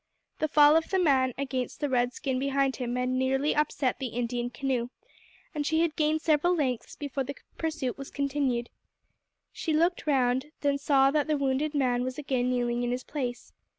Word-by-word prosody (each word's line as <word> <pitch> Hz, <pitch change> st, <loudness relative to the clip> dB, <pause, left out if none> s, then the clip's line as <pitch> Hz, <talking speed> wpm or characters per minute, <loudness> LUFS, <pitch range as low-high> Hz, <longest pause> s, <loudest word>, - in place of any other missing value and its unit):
The 310 Hz, -, +1 dB
fall 295 Hz, 0 st, +6 dB
of 325 Hz, 0 st, +2 dB
the 380 Hz, -, +1 dB
man 265 Hz, -8 st, +3 dB
against 260 Hz, -2 st, -3 dB
the 290 Hz, -, 0 dB
red 245 Hz, -2 st, +1 dB
skin 260 Hz, 0 st, -2 dB
behind 275 Hz, 0 st, +1 dB
him 245 Hz, -1 st, -3 dB
had 250 Hz, 0 st, 0 dB
nearly 265 Hz, +3 st, +1 dB
upset 285 Hz, -3 st, 0 dB
the 265 Hz, -, -2 dB
Indian 240 Hz, +1 st, -2 dB
canoe, 245 Hz, 0 st, -2 dB, 0.6 s
and 300 Hz, -2 st, -2 dB
she 320 Hz, +2 st, +1 dB
had 330 Hz, -3 st, 0 dB
gained 310 Hz, 0 st, +1 dB
several 325 Hz, +3 st, +3 dB
lengths 260 Hz, -7 st, -2 dB
before 280 Hz, -2 st, -3 dB
the 280 Hz, +2 st, -6 dB, 0.2 s
pursuit 310 Hz, -6 st, -2 dB
was 275 Hz, -, -7 dB
continued. 275 Hz, -4 st, -1 dB, 0.8 s
She 320 Hz, -, -2 dB
looked 335 Hz, +2 st, +1 dB
round, 260 Hz, -1 st, +2 dB, 0.2 s
and 280 Hz, -1 st, +1 dB
saw 275 Hz, -1 st, +4 dB
that 300 Hz, +1 st, +1 dB
the 305 Hz, -1 st, +1 dB
wounded 280 Hz, +2 st, 0 dB
man 250 Hz, -3 st, +1 dB
was 255 Hz, 0 st, -4 dB
again 260 Hz, -4 st, -1 dB
kneeling 240 Hz, -1 st, 0 dB
in 245 Hz, -, -1 dB
his 250 Hz, +1 st, -2 dB
place. 250 Hz, -5 st, -5 dB
270 Hz, 185 wpm, -28 LUFS, 250-295 Hz, 0.8 s, fall